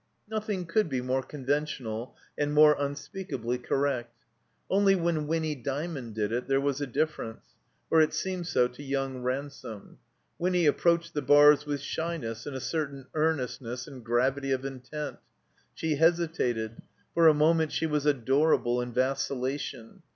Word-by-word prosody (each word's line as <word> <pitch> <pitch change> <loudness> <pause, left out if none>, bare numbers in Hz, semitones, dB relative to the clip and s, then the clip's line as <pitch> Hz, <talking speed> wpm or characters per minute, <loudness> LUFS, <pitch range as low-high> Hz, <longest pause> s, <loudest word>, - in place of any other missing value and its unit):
Nothing 210 -4 -3
could 170 +2 +1
be 130 -2 -1
more 130 +1 0
conventional 130 -5 -3 0.2
and 145 0 -1
more 150 0 +7
unspeakably 140 - -3
correct. 125 -3 -1 0.5
Only 195 0 +4
when 165 -4 0
Winny 160 -1 0
Dymond 135 -2 -4
did 105 -1 -1
it 120 +2 -2
there 135 0 +3
was 140 0 -1
a 145 - -1
difference, 140 -4 -2 0.5
or 160 - +6
it 155 - +3
seemed 185 -2 -3
so 125 -7 +3
to 125 +3 -13
yotmg 135 -2 -2
Ransome. 130 -5 -5 0.4
Winny 180 -1 +2
approached 170 +2 +2
the 150 - -1
bars 145 +1 +6
with 145 -2 -2
shjmess 145 -8 -4
and 145 - -5
a - - -3
certain 140 0 -3
earnestness 130 -5 -1
and 130 -3 -11
gravity 135 +4 +1
of 130 0 0
intent. 135 +3 -6 0.6
She 160 -2 -1
hesitated; 155 -9 +1 0.3
for 165 -1 +6
a 155 - +7
moment 160 +1 +3
she - - 0
was 150 -2 0
adorable 130 -2 +2
in 120 0 -4
vacil 130 +1 0
lation. 130 -3 -4
140 Hz, 150 wpm, -28 LUFS, 125-160 Hz, 0.6 s, more